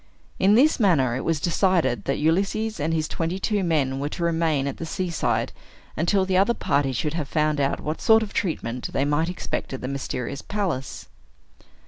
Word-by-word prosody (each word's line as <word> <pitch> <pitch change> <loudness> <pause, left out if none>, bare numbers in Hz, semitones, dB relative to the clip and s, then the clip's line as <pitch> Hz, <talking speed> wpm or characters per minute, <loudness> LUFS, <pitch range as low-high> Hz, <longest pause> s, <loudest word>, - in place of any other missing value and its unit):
In 200 +2 +5
this 285 +6 +4
manner, 145 - +3
it 130 - -3
was 165 -2 0
decided 175 -5 +1
that 135 - 0
Ulysses 195 +8 0
and 150 +3 0
his 155 -1 0
twenty 165 +2 -2
two 205 0 0
men 140 -6 0
were 145 +1 -2
to 170 - -5
remain 165 -4 +1
at 140 - -3
the 165 - -5
seaside 175 0 -1 0.4
until 190 +4 +2
the 185 -1 +1
other 200 +5 +3
party 140 -1 +1
should 150 +4 -2
have 160 -4 -3
found 150 -2 +1
out 135 - 0
what 155 +1 -4
sort 225 0 +5
of 205 - -7
treatment 125 - -2
they 135 - +1
might 150 +4 +1
expect 180 - -4
at 130 - -5
the 125 - -4
mysterious 135 -1 -4
palace. 185 -10 -3
160 Hz, 190 wpm, -24 LUFS, 140-190 Hz, 0.4 s, In